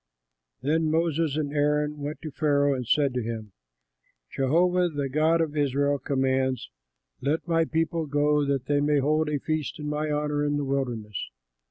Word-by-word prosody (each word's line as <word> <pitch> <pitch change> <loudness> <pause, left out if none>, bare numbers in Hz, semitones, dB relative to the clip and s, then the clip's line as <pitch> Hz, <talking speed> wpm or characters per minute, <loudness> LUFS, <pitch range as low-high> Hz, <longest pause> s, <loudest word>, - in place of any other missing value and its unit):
Then 155 +3 +1
Moses 160 -2 +1
and 145 -2 -2
Aaron 150 0 +1
went 145 +3 -5
to 155 - -5
Pharaoh 145 -1 +2
and 125 -3 -4
said 140 0 +2
to 125 - -1
him, 110 -2 -5 0.8
"Jehovah, 175 +6 +2
the 145 -3 -3
God 160 +4 +2
of 155 -2 -2
Israel 145 0 +1
commands, 130 -1 0 0.5
'Let 145 +6 -1
my 165 -1 +2
people 165 0 -1
go 145 +1 +2
that 140 -2 -1
they 145 0 +2
may 145 0 +2
hold 155 +3 +1
a 150 - 0
feast 155 +1 -3
in 150 - -7
my 150 +1 -1
honor 150 0 0
in 145 0 0
the 145 - -2
wilderness.'" 120 -7 -3
145 Hz, 170 wpm, -26 LUFS, 140-155 Hz, 0.8 s, Pharaoh